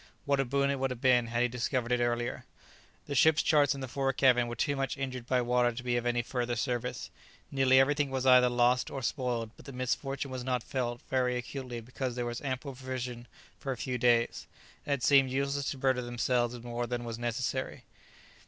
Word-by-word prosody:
What 140 Hz, -1 st, +2 dB
a 135 Hz, -, +2 dB
boon 140 Hz, +2 st, +1 dB
it 140 Hz, -, -2 dB
would 135 Hz, 0 st, 0 dB
have 125 Hz, -2 st, -5 dB
been 125 Hz, -2 st, +4 dB
had 120 Hz, +1 st, 0 dB
he -, -, +3 dB
discovered 125 Hz, 0 st, -2 dB
it 125 Hz, -, +2 dB
earlier! 120 Hz, 0 st, -1 dB, 0.6 s
The 145 Hz, -, -5 dB
ship's 155 Hz, +2 st, +4 dB
charts 145 Hz, -2 st, +4 dB
in 135 Hz, -, -7 dB
the 130 Hz, -, -4 dB
fore 135 Hz, +2 st, 0 dB
cabin 125 Hz, -2 st, +4 dB
were 120 Hz, -, -5 dB
too 145 Hz, +4 st, 0 dB
much 135 Hz, 0 st, -2 dB
injured 130 Hz, -3 st, -4 dB
by 125 Hz, -1 st, +2 dB
water 120 Hz, 0 st, +2 dB
to 125 Hz, +2 st, -7 dB
be 125 Hz, -1 st, 0 dB
of 120 Hz, 0 st, -1 dB
any 120 Hz, 0 st, +1 dB
further 120 Hz, 0 st, -2 dB
service. 120 Hz, 0 st, -3 dB, 0.4 s
Nearly 130 Hz, -1 st, +4 dB
everything 145 Hz, +1 st, +2 dB
was 130 Hz, -1 st, -2 dB
either 125 Hz, -1 st, +7 dB
lost 120 Hz, +1 st, +2 dB
or 135 Hz, -2 st, -5 dB
spoiled, 120 Hz, -5 st, -2 dB
but -, -, -16 dB
the 140 Hz, -, -8 dB
misfortune 135 Hz, +2 st, -3 dB
was 130 Hz, -1 st, -4 dB
not 125 Hz, -2 st, -1 dB
felt 125 Hz, -4 st, -3 dB
very 125 Hz, -1 st, +1 dB
acutely 125 Hz, -1 st, -6 dB
because 125 Hz, +1 st, -4 dB
there 120 Hz, -1 st, -2 dB
was 120 Hz, 0 st, -4 dB
ample 135 Hz, 0 st, -4 dB
provision 125 Hz, -2 st, -6 dB, 0.3 s
for 135 Hz, -, -3 dB
a -, -, -9 dB
few 125 Hz, 0 st, -3 dB
days, 120 Hz, -1 st, +2 dB, 0.4 s
and 140 Hz, -, +2 dB
it 125 Hz, -, -8 dB
seemed 135 Hz, -2 st, +5 dB
useless 140 Hz, +1 st, -1 dB
to -, -, -4 dB
burden 130 Hz, -1 st, +1 dB
themselves 120 Hz, 0 st, 0 dB
with 120 Hz, -, -10 dB
more 120 Hz, 0 st, -3 dB
than 120 Hz, 0 st, -3 dB
was 115 Hz, -1 st, -5 dB
necessary. 125 Hz, +2 st, -3 dB
125 Hz, 220 wpm, -30 LUFS, 120-135 Hz, 0.6 s, either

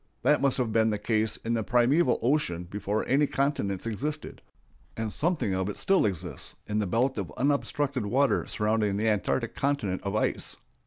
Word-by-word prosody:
That 150 Hz, -, +4 dB
must 140 Hz, -2 st, +2 dB
have 120 Hz, -4 st, -1 dB
been 110 Hz, -1 st, +3 dB
the 105 Hz, -, 0 dB
case 110 Hz, +1 st, 0 dB
in 115 Hz, -, -3 dB
the 115 Hz, -, +1 dB
primeval 125 Hz, -, +3 dB
ocean 120 Hz, -, +1 dB
before 105 Hz, +3 st, -3 dB
any 140 Hz, +3 st, +3 dB
continents 135 Hz, -11 st, -1 dB
existed; 145 Hz, +7 st, -4 dB, 0.6 s
and 110 Hz, -2 st, -3 dB
something 160 Hz, -, 0 dB
of 95 Hz, +1 st, -1 dB
it -, -, -5 dB
still 195 Hz, -, +3 dB
exists 95 Hz, -6 st, -5 dB
in 105 Hz, 0 st, -1 dB
the 105 Hz, -, 0 dB
belt 120 Hz, +5 st, +1 dB
of 90 Hz, -7 st, -4 dB
unobstructed 140 Hz, -3 st, 0 dB
water 130 Hz, 0 st, +2 dB
surrounding 105 Hz, -2 st, 0 dB
the 110 Hz, +2 st, 0 dB
Antarctic 110 Hz, +3 st, 0 dB
continent 135 Hz, -10 st, -1 dB
of 100 Hz, +1 st, -3 dB
ice. 110 Hz, -, 0 dB
110 Hz, 175 wpm, -28 LUFS, 105-140 Hz, 0.6 s, That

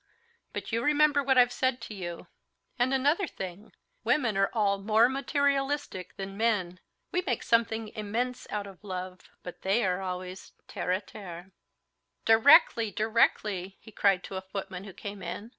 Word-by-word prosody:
But -, -, -6 dB
you 230 Hz, 0 st, 0 dB
remember 295 Hz, 0 st, +4 dB
what 265 Hz, -1 st, +2 dB
I've 245 Hz, -1 st, +6 dB
said 260 Hz, 0 st, 0 dB
to -, -, -7 dB
you. 175 Hz, -4 st, -6 dB, 0.5 s
And 245 Hz, +2 st, +2 dB
another 290 Hz, +8 st, +2 dB
thing, 190 Hz, 0 st, -8 dB, 0.3 s
women 240 Hz, -9 st, +2 dB
are 195 Hz, 0 st, +2 dB
all 200 Hz, -3 st, +1 dB
more 220 Hz, +3 st, +4 dB
materialistic 275 Hz, -, -1 dB
than 195 Hz, 0 st, -6 dB
men. 200 Hz, -6 st, 0 dB, 0.3 s
We 360 Hz, -, +1 dB
make 250 Hz, -10 st, -2 dB
something 225 Hz, -1 st, +1 dB
immense 230 Hz, +5 st, -3 dB
out 205 Hz, -1 st, -3 dB
of 195 Hz, 0 st, -13 dB
love, 185 Hz, -2 st, -5 dB, 0.2 s
but 180 Hz, -, -9 dB
they 200 Hz, +4 st, +2 dB
are 180 Hz, 0 st, 0 dB
always 185 Hz, 0 st, -6 dB
terre -, -, -5 dB
à -, -, -22 dB
terre." 185 Hz, -3 st, -10 dB, 0.7 s
"Directly, 225 Hz, 0 st, +6 dB
directly!" 210 Hz, -3 st, +1 dB
he 220 Hz, -, -14 dB
cried 195 Hz, -3 st, +2 dB
to 190 Hz, -, -6 dB
a -, -, -3 dB
footman 190 Hz, 0 st, -6 dB
who 195 Hz, -, -9 dB
came 200 Hz, +2 st, -7 dB
in. 205 Hz, +5 st, -6 dB
210 Hz, 160 wpm, -29 LUFS, 190-245 Hz, 0.7 s, I've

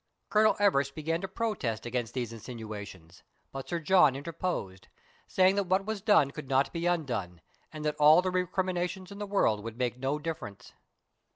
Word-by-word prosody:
Colonel 215 Hz, 0 st, +4 dB
Everest 140 Hz, -10 st, +2 dB
began 165 Hz, +2 st, -2 dB
to 195 Hz, -, -3 dB
protest 190 Hz, -, -3 dB
against 120 Hz, -1 st, -3 dB
these 120 Hz, -3 st, -3 dB
insinuations, 105 Hz, -7 st, -9 dB, 0.3 s
but 135 Hz, 0 st, -7 dB
Sir 170 Hz, -, -1 dB
John 160 Hz, -4 st, +4 dB
interposed, 140 Hz, -, -4 dB, 0.4 s
saying 185 Hz, 0 st, +4 dB
that 200 Hz, -, +1 dB
what 190 Hz, +2 st, +1 dB
was 220 Hz, -2 st, -3 dB
done 190 Hz, -10 st, +4 dB
could 140 Hz, -1 st, -9 dB
not 135 Hz, +1 st, +2 dB
be 170 Hz, 0 st, -1 dB
undone, 125 Hz, -, -2 dB, 0.3 s
and 155 Hz, 0 st, -7 dB
that 150 Hz, -, -1 dB
all 155 Hz, +4 st, +7 dB
the 185 Hz, -, 0 dB
recriminations 185 Hz, 0 st, -2 dB
in 200 Hz, -, -9 dB
the 205 Hz, -, -4 dB
world 110 Hz, -, +1 dB
would 115 Hz, 0 st, -7 dB
make 125 Hz, -1 st, -2 dB
no 135 Hz, +3 st, -1 dB
difference. 150 Hz, -10 st, -7 dB
150 Hz, 175 wpm, -29 LUFS, 120-185 Hz, 0.4 s, all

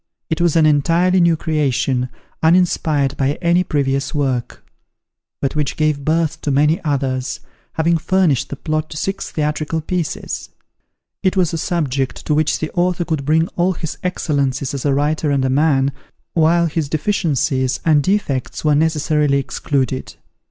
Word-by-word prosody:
It 160 Hz, -, 0 dB
was 170 Hz, -2 st, +2 dB
an 160 Hz, -2 st, +5 dB
entirely 170 Hz, +5 st, +3 dB
new 170 Hz, -1 st, +4 dB
creation, 135 Hz, -5 st, 0 dB, 0.3 s
uninspired 160 Hz, -4 st, +2 dB
by 135 Hz, +1 st, +1 dB
any 175 Hz, +1 st, +2 dB
previous 140 Hz, -4 st, -1 dB
work; 130 Hz, -4 st, -2 dB, 0.8 s
but 135 Hz, -, 0 dB
which 150 Hz, -2 st, -1 dB
gave 155 Hz, -2 st, +1 dB
birth 160 Hz, +1 st, 0 dB
to -, -, -2 dB
many 150 Hz, +4 st, +2 dB
others, 135 Hz, -3 st, -1 dB, 0.3 s
having 165 Hz, +1 st, +1 dB
furnished 170 Hz, -6 st, +1 dB
the -, -, -4 dB
plot 155 Hz, +2 st, -2 dB
to 150 Hz, -, -7 dB
six 195 Hz, +5 st, -3 dB
theatrical 155 Hz, +1 st, -2 dB
pieces. 165 Hz, 0 st, -4 dB, 0.7 s
It 190 Hz, -1 st, +1 dB
was 175 Hz, -3 st, +2 dB
a -, -, -1 dB
subject 140 Hz, -7 st, -2 dB
to 150 Hz, -, +1 dB
which 155 Hz, 0 st, +2 dB
the 155 Hz, -, -4 dB
author 175 Hz, -1 st, 0 dB
could 155 Hz, -5 st, -2 dB
bring 160 Hz, +3 st, +3 dB
all 180 Hz, +2 st, 0 dB
his 160 Hz, -2 st, -6 dB
excellences 140 Hz, -7 st, -1 dB
as 140 Hz, -1 st, -4 dB
a 140 Hz, -, +3 dB
writer 150 Hz, +2 st, 0 dB
and 140 Hz, -2 st, +1 dB
a 130 Hz, -, +1 dB
man, 140 Hz, -1 st, +2 dB, 0.4 s
while 170 Hz, +1 st, +3 dB
his 160 Hz, -3 st, -2 dB
deficiencies 150 Hz, -6 st, 0 dB
and 155 Hz, -3 st, +4 dB
defects 150 Hz, -8 st, -1 dB
were 150 Hz, -, +4 dB
necessarily 150 Hz, -2 st, +2 dB
excluded. 135 Hz, -1 st, -2 dB
155 Hz, 155 wpm, -19 LUFS, 140-165 Hz, 0.8 s, an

